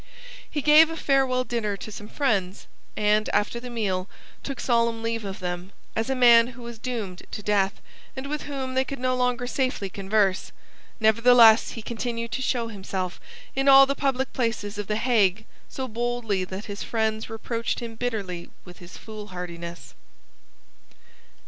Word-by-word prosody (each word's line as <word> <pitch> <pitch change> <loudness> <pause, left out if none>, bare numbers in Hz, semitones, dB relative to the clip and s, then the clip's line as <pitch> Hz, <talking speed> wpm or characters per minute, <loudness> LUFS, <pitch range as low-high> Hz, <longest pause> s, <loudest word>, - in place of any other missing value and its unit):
He 295 -3 -3
gave 305 +2 +7
a 325 - -5
farewell 265 -4 +2
dinner 220 -5 -2
to 215 - -8
some 210 0 -8
friends, 200 -9 -1 0.3
and, 210 0 +2
after 210 +3 +1
the 250 +1 -8
meal, 200 -5 -2 0.3
took 275 -3 -6
solemn 230 -2 +1
leave 230 -1 -2
of 195 -1 -5
them, 180 +1 -5 0.2
as 225 +3 -1
a 265 - +1
man 235 -2 +7
who 245 -1 -11
was 235 -1 -8
doomed 215 -8 -4
to 210 - -6
death, 200 -1 +1 0.4
and 265 0 -5
with 300 +1 -4
whom 270 -2 -4
they 260 0 +2
could 275 +1 -6
no 255 0 0
longer 250 -1 0
safely 255 -6 -1
converse. 195 -1 0 0.5
Nevertheless 230 +1 +6
he 225 - -7
continued 230 0 -4
to 260 - -2
show 245 -3 0
himself 190 -3 -5 0.3
in 270 +1 0
all 270 0 +9
the 275 - 0
public 270 -1 -1
places 220 -4 -2
of 205 - -4
the 210 - 0
Hague 220 -4 +2 0.2
so 260 -1 -4
boldly 230 -4 -1
that 190 +3 -7
his 205 -1 -6
friends 220 -1 -1
reproached 230 +1 -3
him 235 -2 -6
bitterly 210 -7 -4 0.2
with 180 -1 -13
his 175 0 -11
foolhardiness. 180 -5 -8
230 Hz, 165 wpm, -25 LUFS, 205-250 Hz, 0.5 s, all